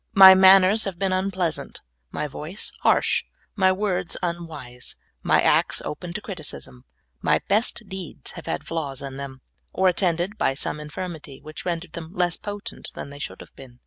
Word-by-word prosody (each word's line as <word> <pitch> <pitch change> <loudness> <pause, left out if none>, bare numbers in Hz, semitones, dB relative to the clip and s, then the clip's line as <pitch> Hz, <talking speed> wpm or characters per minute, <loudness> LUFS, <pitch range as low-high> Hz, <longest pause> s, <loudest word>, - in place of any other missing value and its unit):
My 190 -1 +11
manners 190 +2 +7
have 195 -3 -4
been 195 0 0
unpleasant, 185 -4 -2 0.3
my - - -3
voice 155 +8 -1
harsh, - - +3 0.3
my 190 -2 +4
words 185 -2 0
unwise, 155 -8 -5 0.3
my - - +3
acts - - +3
open 175 +3 -5
to 215 - -4
criticism, 155 - -5 0.4
my - - +3
best 215 +3 +1
deeds 190 -4 -5
have - - -10
had - - -2
flaws 145 -5 -4
in 135 -1 -6
them, 135 -1 -7 0.3
or 190 - +2
attended 180 +2 +1
by 135 - +2
some 150 - -2
infirmity 150 -2 -7
which 155 0 -8
rendered 170 -1 -3
them 170 +3 -8
less 175 -2 +1
potent 205 0 -7
than 140 - -7
they 145 - -10
should - - -6
have - - -14
been. 125 -2 -13
175 Hz, 170 wpm, -24 LUFS, 150-190 Hz, 0.4 s, My